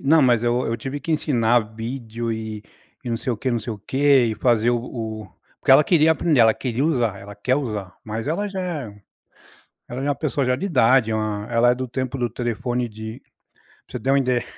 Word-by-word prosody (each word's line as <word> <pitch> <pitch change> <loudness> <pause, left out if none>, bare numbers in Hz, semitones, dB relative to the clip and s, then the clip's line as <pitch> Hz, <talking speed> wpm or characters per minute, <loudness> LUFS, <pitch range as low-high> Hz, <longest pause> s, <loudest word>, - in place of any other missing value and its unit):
não, 155 +2 +5
mas 120 -3 +3
eu 120 +1 +1
eu 115 - -1
tive 135 +5 -5
que 160 +4 -2
ensinar 120 -6 +2
vídeo 115 0 -4
e 110 -1 -5 0.4
e - - -6
não 115 - 0
sei 120 +2 -2
o - - -3
que, 130 +5 -2
não 120 - +1
sei 115 +1 -5
o 105 - -8
quê. 135 +3 +3
E - - -2
fazer 115 +1 +2
o 120 - +1
o 110 -4 -6 0.3
porque - - 0
ela 145 +3 +7
queria 160 -2 +4
aprender, 160 -4 +2
ela 110 -1 +6
queria 125 0 -2
usar, 120 -10 +1
ela 100 +1 -10
quer 115 +6 0
usar. 105 -9 -3
Mas, 110 +2 -5
ela 205 +6 -1
já 195 -1 -4
é 140 - -5 0.9
ela 125 +2 -6
já - - -3
é - - +1
uma 145 - +1
pessoa 145 -2 -1
já 125 0 +2
de 140 - -4
idade, 130 - +3
é - - 0
uma 105 -1 -2
hã, - - -11
ela 120 +1 +4
é - - 0
do 130 0 -4
tempo 130 +1 -3
do 120 -1 -1
telefone 120 +1 -2
de 110 +2 -8 0.7
pra - - -6
você - - -15
ter 135 - -1
uma 140 - +4
ideia, 125 -3 +1
120 Hz, 245 wpm, -22 LUFS, 110-135 Hz, 0.9 s, ela